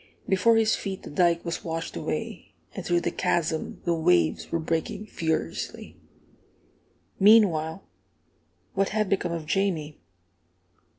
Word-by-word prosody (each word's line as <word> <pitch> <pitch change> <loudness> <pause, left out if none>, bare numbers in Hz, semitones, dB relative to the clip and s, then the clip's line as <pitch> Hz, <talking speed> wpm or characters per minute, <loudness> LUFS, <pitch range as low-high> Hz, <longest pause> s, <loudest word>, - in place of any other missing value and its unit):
Before 195 +4 +4
his 220 -1 +3
feet 195 -2 -5
the - - -9
dike 170 +2 +2
was 170 - -3
washed 165 0 -4
away, - - -5 0.2
and - - -6
through 175 0 +1
the - - -1
chasm 160 -2 -1
the 170 - +2
waves 90 - +2
were 165 - +1
breaking 165 +6 -2
furiously. 160 -6 -3 1.2
Meanwhile, 190 - +4 0.9
what 195 0 +1
had 215 -1 0
become 190 -3 0
of 165 -2 -4
Jamie? 160 -4 -1
170 Hz, 125 wpm, -26 LUFS, 160-195 Hz, 1.2 s, Before